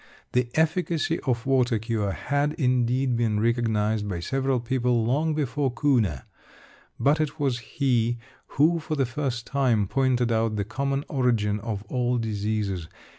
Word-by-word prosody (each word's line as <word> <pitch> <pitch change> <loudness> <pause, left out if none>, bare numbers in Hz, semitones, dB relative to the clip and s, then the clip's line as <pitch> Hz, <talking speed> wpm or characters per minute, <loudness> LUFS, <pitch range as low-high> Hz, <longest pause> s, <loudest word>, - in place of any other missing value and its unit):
The 125 -1 +1
efficacy 165 0 +1
of 120 -3 0
water 130 -3 +2
cure 110 -2 -1
had, 145 +8 -1
indeed, 125 -3 +1
been 115 -3 +1
recognised 110 -2 +1
by 90 -3 -3
several 135 +7 0
people 120 -1 0
long 150 +6 +1
before 145 -2 0
Kuhne, 115 - +1 0.8
but 150 +3 +3
it 155 +1 -3
was 135 -4 0
he 120 -1 0 0.4
who, 165 +4 +4
for 155 0 -3
the 135 -2 +1
first 125 -2 -3
time, 125 -7 +1
pointed 125 +1 +1
out 110 -1 +1
the 100 -1 -1
common 135 +5 -2
origin 115 -6 +1
of 105 -1 -4
all 125 +2 0
diseases. 105 -5 -2
125 Hz, 145 wpm, -25 LUFS, 110-140 Hz, 0.8 s, who